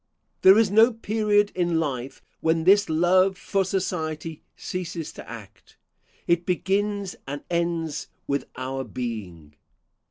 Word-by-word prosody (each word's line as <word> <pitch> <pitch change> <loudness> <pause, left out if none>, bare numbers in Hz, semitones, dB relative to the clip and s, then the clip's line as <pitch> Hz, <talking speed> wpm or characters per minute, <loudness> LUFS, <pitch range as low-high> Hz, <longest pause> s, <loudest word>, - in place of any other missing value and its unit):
There 190 +2 +8
is 220 -3 +3
no 225 +4 +6
period 210 -2 +1
in 175 -2 +1
life 135 -5 -4 0.2
when 160 0 +1
this 200 +2 +5
love 185 +4 +3
for 195 -1 0
society 165 -4 -3
ceases 170 -3 -5
to - - -11
act. - - -12 0.5
It 170 0 +2
begins 195 +2 -1
and 145 +1 -5
ends 170 -3 -1 0.2
with 140 0 -1
our 130 +1 -4
being. 105 - -6
170 Hz, 125 wpm, -25 LUFS, 150-195 Hz, 0.5 s, There